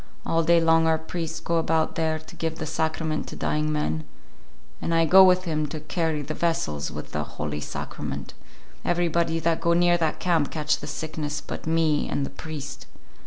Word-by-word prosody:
All 165 - +2
day 170 +1 +5
long 165 0 +4
our 160 0 +4
priest 165 0 -5
go 170 - +1
about 160 -1 +1
there 160 -1 0
to 155 - -13
give 160 0 -3
the 160 - -4
Sacrament 160 0 -1
to - - -7
dying 150 0 0
men, 80 - -1 0.8
and 165 - 0
I 165 0 +4
go 190 +4 +9
with 185 0 +5
him 155 -3 -1
to 155 +2 -5
carry 155 -1 -1
the 155 - -4
vessels 155 - -1
with - - -7
the 75 - -1
Holy 75 0 -4
Sacrament. - - -5 0.5
Everybody 170 -1 +1
that 165 0 +1
go 170 - +3
near 175 0 +4
that 160 -2 0
camp 165 -5 +2
catch 155 -1 0
the 145 - -7
sickness 150 0 -3
but - - -7
me 160 -2 +2
and 140 - 0
the - - -7
priest. 150 -3 -7
160 Hz, 190 wpm, -25 LUFS, 150-165 Hz, 0.8 s, go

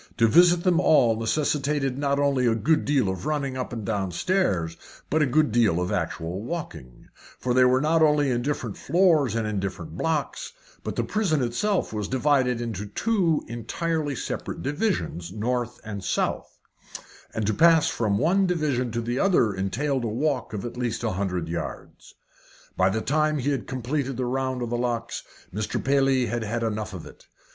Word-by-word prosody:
To 115 - +5
visit 175 +6 +5
them 180 -2 +3
all 135 -10 +4
necessitated 140 +3 0
not 140 0 0
only 140 -3 +2
a 115 - +3
good 155 +8 +1
deal 140 -7 +2
of 95 -1 -3
running 140 -3 -1
up 130 -1 -4
and 115 -3 -5
down 100 -3 -1
stairs, 90 - 0 0.4
but 155 +2 +3
a 150 - +3
good 150 +1 +2
deal 110 -7 +3
of 90 0 -2
actual 85 +4 -3
walking; 85 - -7 0.3
for 125 - -1
they 130 0 +5
were 130 +1 +4
not 160 +2 +2
only 150 -3 +4
in 120 -1 0
different 125 -6 -3
floors 160 - +3
and 115 -1 0
in 105 -2 -1
different 95 -4 -5
blocks, 160 - -2 0.3
but - - -4
the - - 0
prison 180 -10 0
itself 175 - 0
was 105 -2 -2
divided 130 -2 +2
into 105 -4 -4
two 175 - +1
entirely 145 +6 -2
separate - - -5
divisions 145 - -2
north 120 +3 -2
and 100 -3 -6
south - - -2 0.8
and 110 - -1
to 110 - +1
pass 165 +3 +5
from 105 -3 0
one 185 - +3
division 150 -8 0
to 115 - -1
the 120 +3 -2
other 170 - +3
entailed 125 +8 -1
a - - -1
walk 130 +4 -1
of 105 -1 -5
at 120 - -6
least 120 -3 -2
a - - 0
hundred 90 -3 -2
yards. 85 +1 -7 0.6
By 95 +1 +3
the 110 +3 -1
time 155 +3 +1
he 140 +1 0
had 135 -4 -3
completed 130 +1 -2
the 130 - -1
round 130 0 -1
of 120 - -4
the 120 - 0
locks, 120 -1 -2 0.3
Mr. 105 +2 -2
Paley 135 -2 +3
had 120 0 -2
had 115 +2 -2
about 115 - 0
enough 105 -1 -5
of - - -8
it. - - -15
125 Hz, 185 wpm, -25 LUFS, 110-150 Hz, 0.8 s, To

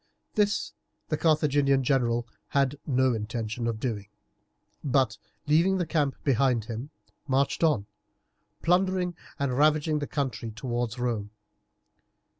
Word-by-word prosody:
This 210 0 +1 0.4
the 155 - +1
Carthaginian 145 -4 +3
general 120 -3 +1 0.2
had 140 0 +1
no 130 -2 +3
intention 110 +1 -3
of 115 -2 -2
doing, 110 -5 -3 0.8
but, 135 -2 +2 0.3
leaving 170 +6 +4
the 180 - 0
camp 150 -4 0
behind 125 -4 +2
him, 115 +5 -5 0.4
marched 135 +4 +1
on, 150 -11 +3 0.8
plundering 180 0 +2 0.2
and 140 -3 0
ravaging 150 +2 +3
the 145 - -3
country 130 -5 -2
towards 120 +1 -3
Rome. 115 -4 -1
135 Hz, 115 wpm, -28 LUFS, 120-150 Hz, 0.8 s, leaving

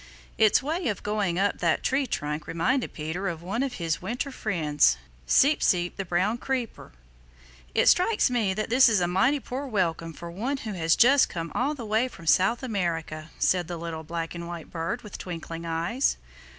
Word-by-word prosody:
Its 215 +2 +5
way 325 +5 -2
of 210 -4 -2
going 205 -4 -1
up 200 +2 +1
that 170 -3 +1
tree 270 0 +1
trunk 150 -6 -3
reminded 240 +11 0
Peter 165 +5 -4
of 170 -2 -4
one 200 +7 -2
of 270 -2 -1
his 165 -3 -2
winter 250 +4 -3
friends, 150 - +2 0.3
Seep 290 +2 +4
Seep 175 -1 +1
the 195 - -4
Brown 185 +7 0
Creeper. 255 -4 -4 0.8
"It - - +4
strikes 420 +5 +4
me 225 -7 0
that 215 +2 -3
this 255 0 +7
is 215 -4 +3
a 175 - +1
mighty 195 +11 +2
poor 265 +2 -5
welcome 170 -7 -1
for 170 +2 -8
one 240 +11 -2
who 220 -5 -5
has 165 -3 +2
just 270 +3 +5
come 165 -1 -5
all 285 +5 0
the 245 -5 -7
way 220 +4 +1
from 170 -9 -12
South 190 +10 +3
America," 165 -8 -3
said 180 -2 +1
the 175 - -5
little 165 -1 -5
black 165 +1 -4
and 170 -1 -6
white 170 -2 -8
bird 170 +8 -3
with 210 - -9
twinkling 165 -1 -6
eyes. 170 +11 0
190 Hz, 190 wpm, -26 LUFS, 165-245 Hz, 0.8 s, this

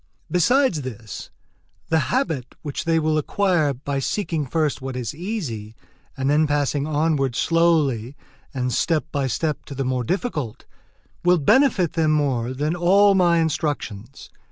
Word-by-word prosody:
Besides 180 - +3
this, 115 -5 -8 0.6
the 160 - +3
habit 160 - -1
which 145 -3 -4
they 165 -1 +2
will 155 -1 +1
acquire, 175 -2 +1
by 140 +1 -3
seeking 160 -1 -2
first 155 0 0
what 130 -1 -5
is 125 -4 -3
easy, 145 - -5 0.4
and 135 0 -1
then 150 +2 +3
passing 145 0 0
onward 150 -4 0
slowly 145 -7 +2 0.4
and 125 -2 -2
step 160 +5 +1
by 140 -2 -1
step 150 +4 -2
to 140 - -8
the 135 0 -2
more 130 -1 -1
difficult, 150 - -3 0.6
will 180 0 +5
benefit 190 - +3
them 160 -2 +1
more 130 -5 0
than 150 +5 -1
all 195 +4 +5
my 175 -3 +4
instructions. 145 -7 -3
150 Hz, 145 wpm, -22 LUFS, 130-170 Hz, 0.6 s, will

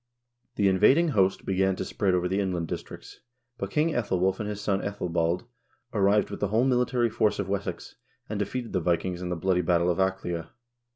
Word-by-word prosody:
The 100 - +2
invading 130 - +4
host 95 -7 +1
began 95 0 +1
to - - -4
spread 95 -3 0
over 90 0 +1
the 95 +2 0
inland 90 -4 -1
districts, - - -8 0.4
but - - -3
King 155 +2 +1
iEthelwulf 95 - 0
and 105 -1 -3
his 105 -1 -4
son 100 -1 0
iEthelbald 90 -2 -1 0.5
arrived 100 0 +2
with - - -5
the 105 - 0
whole 110 +5 +2
military 125 -2 +2
force 105 -1 +1
of 100 - -2
Wessex, 100 0 -4 0.3
and 105 -1 -4
defeated 120 +3 -3
the 95 - +1
Vikings 85 +1 -1
in 90 - -4
the 90 - -1
bloody 90 +2 +1
battle 85 0 +2
of 85 - -3
Aclea. 90 -3 -1
95 Hz, 190 wpm, -27 LUFS, 90-105 Hz, 0.5 s, invading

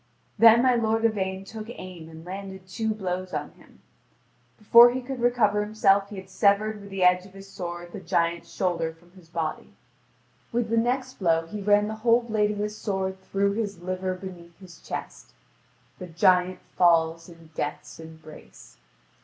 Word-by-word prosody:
Then 230 +1 +7
my 255 -1 +4
lord 225 -1 +1
Yvain 190 -3 -1
took 220 +2 -8
aim 180 -8 -9
and 160 0 -12
landed 190 0 -8
two 220 +4 -2
blows 185 -3 -4
on - - -4
him. - - -22 0.8
Before 235 +3 +8
he 250 +2 -2
could 260 0 -6
recover 230 -4 +2
himself 200 -2 +2
he 210 - -8
had 190 -1 -9
severed 210 +1 +1
with 200 - -11
the 195 -1 -2
edge 180 +1 +4
of 190 - -19
his 195 0 -11
sword 175 -3 -7
the - - -6
giant's 170 -1 -1
shoulder 170 -4 -1
from 175 +2 -24
his 180 -3 -19
body. 160 -2 -4 0.8
With 235 -2 -1
the 230 - +2
next 255 +2 -1
blow 165 -3 +2
he 205 +5 -7
ran 205 +1 +3
the 220 0 -5
whole 235 +1 +4
blade 215 -3 +1
of 210 - -3
his 210 +1 -3
sword 190 -3 -3
through 200 +1 0
his 200 -4 -4
liver 185 0 -2
beneath 180 -2 -11
his 185 -3 -15
chest; - - -7 0.7
the 180 - -7
giant 180 +2 +2
falls 165 -1 +3
in 165 -2 -16
death's 145 +1 -5
embrace. 160 -1 -14
190 Hz, 175 wpm, -26 LUFS, 175-215 Hz, 0.8 s, Before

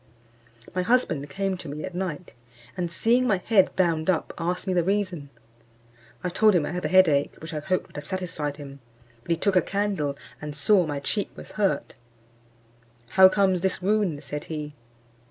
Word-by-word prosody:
My 185 - 0
husband 180 - +1
came 195 +3 -2
to 170 -4 -9
me 150 +2 -6
at 185 - -7
night, 180 -2 -4 0.4
and 175 -2 -3
seeing 240 +7 +2
my 195 - +3
head 195 +1 +2
bound 165 -2 +1
up, 175 -4 0
asked 175 +2 -2
me 190 - 0
the 175 -1 +2
reason. 185 -6 -1 0.9
I - - 0
told 210 +3 +4
him 160 -4 +2
I - - -4
had 180 +1 -3
the 155 - -1
head 185 +1 +6
ache, 145 -2 +1
which 160 +1 -8
I 155 - -2
hoped 185 +4 -1
would - - -14
have 145 - -7
satisfied 160 -6 -3
him, 140 -2 -10 0.4
but 125 - -18
he 170 - +2
took 195 +3 +1
a 180 - +6
candle, 195 -8 -1 0.2
and 150 -1 -6
saw 180 +4 +3
my 145 -1 -3
cheek 200 +8 -2
was - - -11
hurt: 195 -9 -1 1.2
"How 190 +6 +7
comes 190 -2 +2
this 190 0 0
wound?" 190 -6 0
said 145 +1 -5
he. 150 -2 -5
180 Hz, 190 wpm, -25 LUFS, 150-190 Hz, 1.2 s, How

